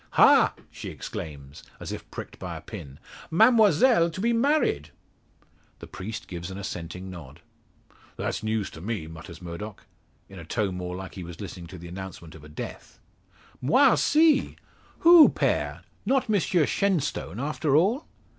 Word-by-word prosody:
"Ha!" -, -, +6 dB, 0.2 s
she -, -, -7 dB
exclaims, 70 Hz, -1 st, -8 dB, 0.2 s
as -, -, -6 dB
if -, -, -7 dB
pricked -, -, -8 dB
by -, -, -5 dB
a -, -, -10 dB
pin, 70 Hz, 0 st, -9 dB, 0.3 s
"Mademoiselle 220 Hz, -, +5 dB
to 165 Hz, -, -8 dB
be 235 Hz, +4 st, +2 dB
married?" 230 Hz, -, +1 dB, 0.9 s
The -, -, -10 dB
priest 110 Hz, +4 st, -7 dB
gives 85 Hz, -1 st, -6 dB
an 95 Hz, -, -7 dB
assenting 90 Hz, -1 st, -6 dB
nod. 80 Hz, -8 st, -11 dB, 0.8 s
"That's -, -, -2 dB
news 110 Hz, -2 st, -2 dB
to 80 Hz, -, -11 dB
me," 105 Hz, -4 st, -3 dB
mutters 80 Hz, +2 st, -11 dB
Murdock, 95 Hz, +5 st, -7 dB, 0.4 s
in 95 Hz, -2 st, -11 dB
a -, -, -8 dB
tone 100 Hz, +2 st, -2 dB
more 90 Hz, 0 st, -4 dB
like 95 Hz, 0 st, -7 dB
he 95 Hz, -, -7 dB
was 85 Hz, 0 st, -9 dB
listening 90 Hz, -4 st, -7 dB
to 95 Hz, -, -10 dB
the 85 Hz, 0 st, -10 dB
announcement 90 Hz, -3 st, -8 dB
of 80 Hz, -, -13 dB
a 75 Hz, -, -12 dB
death. 75 Hz, -, -8 dB, 0.6 s
"Moi 255 Hz, -, +5 dB
aussi! 310 Hz, -2 st, +3 dB, 0.5 s
Who, 335 Hz, -2 st, +9 dB
Pere? -, -, -1 dB, 0.2 s
Not 265 Hz, -1 st, +1 dB
Monsieur 180 Hz, -5 st, +2 dB
Shenstone, 150 Hz, -, -1 dB
after 145 Hz, +1 st, 0 dB
all?" 205 Hz, -, +2 dB
100 Hz, 155 wpm, -26 LUFS, -, 0.9 s, Who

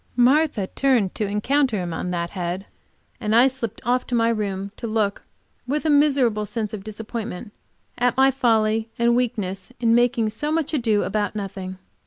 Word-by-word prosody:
Martha 250 Hz, -3 st, +3 dB
turned 240 Hz, -4 st, +1 dB
to 210 Hz, -, -2 dB
encounter 240 Hz, +4 st, +1 dB
him 175 Hz, -3 st, -3 dB
on 180 Hz, -, -3 dB
that 170 Hz, -1 st, -2 dB
head, 180 Hz, +1 st, -3 dB, 0.5 s
and 215 Hz, +1 st, 0 dB
I 240 Hz, +2 st, +7 dB
slipped 245 Hz, -5 st, -3 dB
off 250 Hz, +1 st, +1 dB
to 245 Hz, -, -1 dB
my 230 Hz, 0 st, +3 dB
room 200 Hz, -3 st, -2 dB
to 235 Hz, -, -5 dB
look, 215 Hz, -2 st, 0 dB, 0.5 s
with 295 Hz, +4 st, -1 dB
a 310 Hz, -, +3 dB
miserable 270 Hz, -8 st, +3 dB
sense 220 Hz, -1 st, -3 dB
of 205 Hz, -3 st, -5 dB
disappointment, 215 Hz, -1 st, -6 dB, 0.5 s
at 245 Hz, 0 st, +2 dB
my 270 Hz, 0 st, +5 dB
folly 225 Hz, -4 st, +1 dB
and 235 Hz, 0 st, +3 dB
weakness 210 Hz, -5 st, -2 dB
in 230 Hz, -2 st, +3 dB
making 240 Hz, -2 st, +3 dB
so 295 Hz, +8 st, -3 dB
much 320 Hz, -1 st, 0 dB
ado 225 Hz, -7 st, +2 dB
about 205 Hz, 0 st, -1 dB
nothing. 190 Hz, -2 st, -5 dB
225 Hz, 175 wpm, -23 LUFS, 205-250 Hz, 0.5 s, I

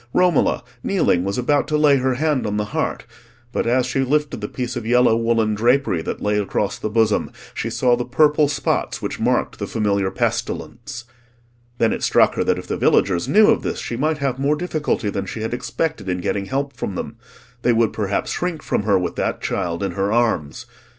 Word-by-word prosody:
Romola, 180 Hz, -5 st, +2 dB, 0.2 s
kneeling, 90 Hz, -, +1 dB
was 100 Hz, +1 st, -2 dB
about 140 Hz, +3 st, +1 dB
to 150 Hz, -, +1 dB
lay 150 Hz, -2 st, +5 dB
her 130 Hz, -1 st, 0 dB
hand 150 Hz, -3 st, 0 dB
on 105 Hz, 0 st, -2 dB
the 105 Hz, -, 0 dB
heart; -, -, -2 dB, 0.5 s
but -, -, -1 dB
as 125 Hz, +1 st, +2 dB
she 130 Hz, +2 st, -2 dB
lifted 145 Hz, -1 st, 0 dB
the 105 Hz, -, -3 dB
piece 125 Hz, +2 st, -4 dB
of 120 Hz, -, -4 dB
yellow 120 Hz, 0 st, +4 dB
woollen 115 Hz, -1 st, +1 dB
drapery 120 Hz, -4 st, +2 dB
that -, -, -4 dB
lay 105 Hz, 0 st, +1 dB
across 100 Hz, 0 st, -1 dB
the 110 Hz, -, -3 dB
bosom, 110 Hz, -1 st, +2 dB, 0.2 s
she -, -, -3 dB
saw 125 Hz, -1 st, +2 dB
the 120 Hz, -, -2 dB
purple 150 Hz, +4 st, +3 dB
spots 140 Hz, -2 st, -1 dB
which -, -, -4 dB
marked -, -, 0 dB
the -, -, -3 dB
familiar 100 Hz, -3 st, 0 dB
pestilence. 120 Hz, +4 st, -3 dB, 0.7 s
Then 115 Hz, -2 st, +2 dB
it -, -, -4 dB
struck -, -, +4 dB
her -, -, 0 dB
that -, -, +2 dB
if -, -, -7 dB
the -, -, -3 dB
villagers 90 Hz, -3 st, +2 dB
knew 215 Hz, +1 st, +6 dB
of -, -, +1 dB
this, -, -, -3 dB
she 120 Hz, -, -4 dB
might 155 Hz, +5 st, 0 dB
have 135 Hz, -3 st, -2 dB
more 140 Hz, +2 st, +2 dB
difficulty 150 Hz, -, -1 dB
than 100 Hz, -1 st, -3 dB
she 110 Hz, -, -5 dB
had 110 Hz, +2 st, -3 dB
expected 125 Hz, -2 st, -3 dB
in 90 Hz, -, 0 dB
getting 100 Hz, +2 st, -2 dB
help 140 Hz, +5 st, -3 dB
from 100 Hz, -, -4 dB
them; 115 Hz, -, -5 dB, 0.4 s
they 125 Hz, -, +3 dB
would 115 Hz, -1 st, +2 dB
perhaps 100 Hz, -2 st, -1 dB
shrink 175 Hz, -4 st, -3 dB
from -, -, 0 dB
her 100 Hz, -1 st, +2 dB
with 90 Hz, -1 st, -2 dB
that -, -, -1 dB
child 85 Hz, +2 st, -2 dB
in 100 Hz, -, -1 dB
her 100 Hz, +1 st, -1 dB
arms. 110 Hz, -11 st, 0 dB
120 Hz, 210 wpm, -21 LUFS, 105-140 Hz, 0.7 s, knew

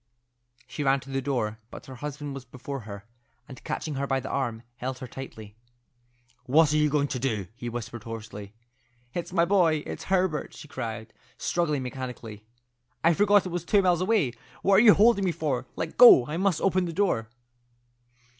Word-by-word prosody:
She 160 Hz, -6 st, -5 dB
ran 135 Hz, 0 st, +3 dB
to 135 Hz, -, -11 dB
the 135 Hz, 0 st, -1 dB
door, 115 Hz, -6 st, -2 dB
but -, -, -11 dB
her 130 Hz, -, -10 dB
husband 145 Hz, +1 st, -6 dB
was 135 Hz, -2 st, -7 dB
before 130 Hz, +2 st, -7 dB
her, 100 Hz, 0 st, -8 dB, 0.4 s
and 130 Hz, -, -12 dB
catching 155 Hz, -, -4 dB
her 140 Hz, 0 st, -2 dB
by 135 Hz, -1 st, +1 dB
the 130 Hz, -, -7 dB
arm, 120 Hz, -4 st, -2 dB
held 130 Hz, +1 st, -4 dB
her 130 Hz, -, -7 dB
tightly. 110 Hz, -5 st, -10 dB, 0.9 s
"What 150 Hz, +3 st, +4 dB
are -, -, +3 dB
you 150 Hz, 0 st, +3 dB
going 145 Hz, 0 st, +1 dB
to 130 Hz, -, -3 dB
do?" 110 Hz, -7 st, -1 dB
he 120 Hz, 0 st, -6 dB
whispered 120 Hz, -1 st, -6 dB
hoarsely. 110 Hz, -2 st, -8 dB, 0.6 s
"It's 175 Hz, -, -4 dB
my 170 Hz, -, +3 dB
boy; 170 Hz, -5 st, +2 dB
it's -, -, -7 dB
Herbert!" 185 Hz, -5 st, 0 dB
she -, -, -11 dB
cried, 115 Hz, -5 st, -6 dB, 0.2 s
struggling 150 Hz, -6 st, -1 dB
mechanically. 125 Hz, -5 st, -7 dB, 0.6 s
"I 170 Hz, -, +5 dB
forgot 205 Hz, +2 st, +4 dB
it -, -, -3 dB
was 175 Hz, -1 st, -3 dB
two 200 Hz, +2 st, +3 dB
miles 180 Hz, -2 st, +2 dB
away. 185 Hz, -, +1 dB, 0.3 s
What 195 Hz, 0 st, +5 dB
are -, -, +5 dB
you 215 Hz, -3 st, +8 dB
holding 215 Hz, -1 st, +4 dB
me 185 Hz, -, +1 dB
for? 140 Hz, -6 st, -2 dB
Let 160 Hz, -, -5 dB
go. 235 Hz, -, +9 dB
I 150 Hz, -, -5 dB
must 185 Hz, -2 st, +1 dB
open 185 Hz, -1 st, +2 dB
the 170 Hz, -, -5 dB
door." 155 Hz, -, 0 dB
140 Hz, 190 wpm, -27 LUFS, 125-175 Hz, 0.9 s, go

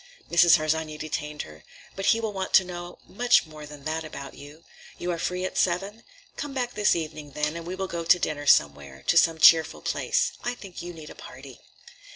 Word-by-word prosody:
Mrs. 170 Hz, 0 st, +6 dB
Harsanyi 155 Hz, 0 st, -2 dB
detained 150 Hz, -1 st, -4 dB
her. 75 Hz, 0 st, -14 dB, 0.3 s
"But 195 Hz, -, -3 dB
he 225 Hz, -, +4 dB
will 220 Hz, -2 st, -3 dB
want 190 Hz, -1 st, -4 dB
to 190 Hz, -, +7 dB
know 175 Hz, -1 st, -8 dB
much 240 Hz, +1 st, +3 dB
more 155 Hz, -1 st, -11 dB
than 145 Hz, -1 st, -12 dB
that 160 Hz, +2 st, -3 dB
about 140 Hz, -3 st, -8 dB
you. 145 Hz, +3 st, -13 dB, 0.3 s
You 175 Hz, -, -3 dB
are 170 Hz, -, -3 dB
free 180 Hz, +2 st, -2 dB
at -, -, -2 dB
seven? 195 Hz, +5 st, -1 dB, 0.3 s
Come 290 Hz, -2 st, -6 dB
back 245 Hz, -2 st, -2 dB
this 210 Hz, 0 st, +2 dB
evening, 155 Hz, -3 st, -6 dB
then, 150 Hz, +2 st, -2 dB
and 170 Hz, 0 st, -7 dB
we 180 Hz, -, -4 dB
will 190 Hz, 0 st, -3 dB
go 170 Hz, -2 st, -4 dB
to 170 Hz, -, +5 dB
dinner 145 Hz, -4 st, -3 dB
somewhere, 70 Hz, -, +2 dB
to -, -, +2 dB
some 165 Hz, -1 st, +4 dB
cheerful 160 Hz, 0 st, +5 dB
place. -, -, 0 dB
I 245 Hz, 0 st, -2 dB
think 195 Hz, -6 st, -10 dB
you 175 Hz, -, -7 dB
need 160 Hz, -3 st, -11 dB
a -, -, -9 dB
party." 130 Hz, -1 st, -12 dB
165 Hz, 210 wpm, -26 LUFS, 150-185 Hz, 0.3 s, to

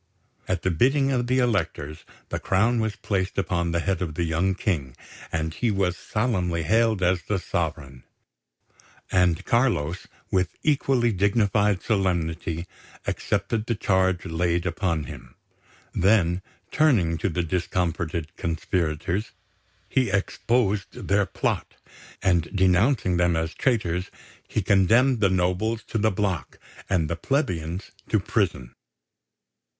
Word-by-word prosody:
At 95 Hz, -2 st, -1 dB
the 95 Hz, -, +2 dB
bidding 135 Hz, -, +3 dB
of 125 Hz, -2 st, 0 dB
the 130 Hz, +1 st, +2 dB
Electors 80 Hz, -, -1 dB, 0.2 s
the -, -, -2 dB
crown 110 Hz, +5 st, +2 dB
was 110 Hz, -2 st, -1 dB
placed 95 Hz, -3 st, -2 dB
upon 85 Hz, -3 st, 0 dB
the 85 Hz, 0 st, 0 dB
head 95 Hz, 0 st, -1 dB
of 80 Hz, -4 st, -3 dB
the 85 Hz, -, 0 dB
young 85 Hz, +4 st, +1 dB
King, 75 Hz, -, -2 dB, 0.4 s
and 80 Hz, 0 st, -2 dB
he 120 Hz, +7 st, 0 dB
was 95 Hz, -3 st, +1 dB
solemnly 90 Hz, -7 st, -1 dB
hailed 110 Hz, +2 st, +2 dB
as 90 Hz, 0 st, +2 dB
the 105 Hz, -, -1 dB
Sovereign; 80 Hz, -7 st, -3 dB, 1.1 s
and 90 Hz, -3 st, +2 dB
Carlos, 105 Hz, -, +1 dB, 0.2 s
with 90 Hz, -2 st, 0 dB
equally 135 Hz, -5 st, +2 dB
dignified 100 Hz, 0 st, +2 dB
solemnity, 85 Hz, -5 st, -1 dB, 0.4 s
accepted 105 Hz, +2 st, -1 dB
the 115 Hz, -, 0 dB
charge 95 Hz, -3 st, +1 dB
laid 85 Hz, 0 st, 0 dB
upon 85 Hz, -2 st, -1 dB
him. -, -, -10 dB, 0.6 s
Then, 95 Hz, -2 st, +3 dB, 0.3 s
turning 100 Hz, -, +3 dB
to 100 Hz, -, 0 dB
the 90 Hz, +1 st, -1 dB
discomfited 85 Hz, -1 st, -2 dB
conspirators, 85 Hz, +3 st, -2 dB, 0.5 s
he 130 Hz, -4 st, +1 dB
exposed 100 Hz, +1 st, 0 dB
their 100 Hz, 0 st, +3 dB
plot; -, -, -2 dB, 0.5 s
and, 85 Hz, -4 st, +2 dB
denouncing 95 Hz, +1 st, +3 dB
them 85 Hz, -1 st, +3 dB
as 80 Hz, 0 st, -1 dB
traitors, 95 Hz, -8 st, 0 dB, 0.4 s
he -, -, -1 dB
condemned 115 Hz, +6 st, +4 dB
the 100 Hz, -2 st, +4 dB
nobles 95 Hz, +5 st, 0 dB
to 115 Hz, -, -1 dB
the 110 Hz, +1 st, +3 dB
block 95 Hz, -4 st, -2 dB, 0.3 s
and 85 Hz, -5 st, +2 dB
the 85 Hz, -, -2 dB
plebeians 90 Hz, -, -2 dB, 0.2 s
to -, -, +3 dB
prison. 60 Hz, -1 st, -1 dB
95 Hz, 130 wpm, -25 LUFS, 85-105 Hz, 1.1 s, condemned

